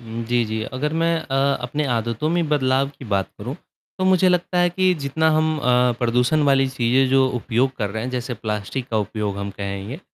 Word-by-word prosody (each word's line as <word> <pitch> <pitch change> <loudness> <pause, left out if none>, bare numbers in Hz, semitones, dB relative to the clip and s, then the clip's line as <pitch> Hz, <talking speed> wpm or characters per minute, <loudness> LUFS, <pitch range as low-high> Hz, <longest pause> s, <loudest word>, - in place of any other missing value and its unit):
हुँ, 115 0 -6
जी, 120 0 +1
जी, 110 0 -3
अगर 150 +4 -2
मैं 165 +1 +1
अ, 135 - -5 0.3
अपने 145 +5 -2
आदतों 115 +5 -1
में 170 -2 0
बदलाव 135 -2 +2
की - - -9
बात 100 -4 -1
करूँ - - -5 0.4
तो 185 - 0
मुझे 185 0 +4
लगता 180 0 +1
है 175 0 +3
कि 185 +1 +2
जितना 160 +3 +1
हम 155 0 +2
अ, 125 -3 +3
प्रदूषण 125 +5 +2
वाली 135 -2 +3
चीज़ें 130 +1 +2
जो 135 0 +4
उपयोग 125 +2 0
कर 105 -3 -2
रहे 110 +2 -4
हैं 125 - -3
जैसे 125 0 -3
प्लास्टिक 110 +3 -4
का 110 - 0
उपयोग 105 -1 -3
हम 100 0 -4
कहेंगे। 100 - -6
130 Hz, 205 wpm, -22 LUFS, 115-150 Hz, 0.4 s, मुझे